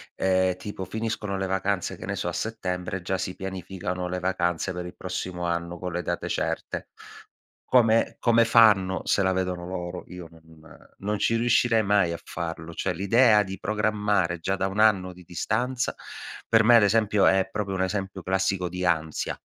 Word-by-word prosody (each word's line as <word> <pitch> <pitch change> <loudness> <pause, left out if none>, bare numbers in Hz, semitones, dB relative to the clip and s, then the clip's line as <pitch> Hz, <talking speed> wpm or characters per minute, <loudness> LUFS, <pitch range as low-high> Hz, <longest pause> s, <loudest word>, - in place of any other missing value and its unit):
,ehm, 95 -1 +2
tipo 100 -1 -6
finiscono 105 -1 -3
le 95 - -1
vacanze, 95 0 -1
che - - -9
ne - - -2
so, - - -3
a - - -2
settembre 90 -4 -3
già 95 +1 -1
si 95 -1 -4
pianificano 90 -1 -5
le 90 +1 -3
vacanze 90 -1 -1
per 90 0 -5
il - - -10
prossimo 90 -1 -4
anno 85 0 -2
con 90 +1 -5
le 90 - -1
date - - -3
certe. - - -3 0.8
Come 115 -2 +4
come 115 -1 +4
fanno? 105 -5 +5
Se 100 - +2
la 95 - +2
vedono 90 -1 -2
loro, 90 -1 -5
io 90 -2 -9
non 80 -1 -19 0.4
non 105 +1 -2
ci 115 - +2
riuscirei 115 -1 +3
mai 100 -4 +2
a 85 - -6
farlo. 85 0 -6
Cioè 95 +1 -2
l'idea 105 +2 +4
di 95 -1 -7
programmare 105 -4 0
già 95 +4 -1
da 95 0 -1
un 95 +2 -4
anno 95 -4 +3
di 90 0 -15
distanza, 120 +9 -1 0.6
per 115 0 +5
me 120 +2 +7
ad - - +5
esempio 105 -1 +3
è 95 0 +3
proprio 100 -2 -3
un 95 - 0
esempio 95 -1 -3
classico 95 -1 0
di 90 +1 -4
ansia, 80 -2 -1
95 Hz, 180 wpm, -26 LUFS, 90-105 Hz, 0.8 s, me